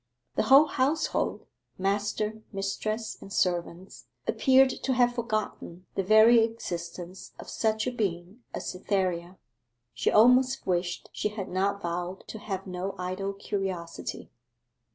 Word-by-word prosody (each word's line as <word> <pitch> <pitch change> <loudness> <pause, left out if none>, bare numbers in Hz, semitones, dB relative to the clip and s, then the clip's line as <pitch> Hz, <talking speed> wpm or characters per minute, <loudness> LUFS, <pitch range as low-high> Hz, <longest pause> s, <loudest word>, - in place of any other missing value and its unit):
The - - +1
whole 275 +3 +9
household 285 +2 0 0.3
master, 210 +2 -1
mistress, 215 +3 -3
and 195 - -11
servants 180 0 -2 0.2
appeared 265 0 +4
to 265 - -2
have 245 -1 +3
forgotten 215 -6 -3
the - - 0
very 220 +4 +7
existence 180 -5 -5
of - - -10
such 220 0 0
a 255 - 0
being 195 -2 -3
as - - -5
Cytherea. 185 -2 -2 0.6
She 115 -1 0
almost 250 +4 +5
wished 175 -1 -1
she 210 - -1
had 205 -2 -6
not 200 +2 0
vowed 175 +2 -4
to 220 - -6
have 195 -2 -4
no 185 +1 -4
idle 185 +2 -3
curiosity. 190 -4 -4
195 Hz, 130 wpm, -28 LUFS, 180-220 Hz, 0.6 s, whole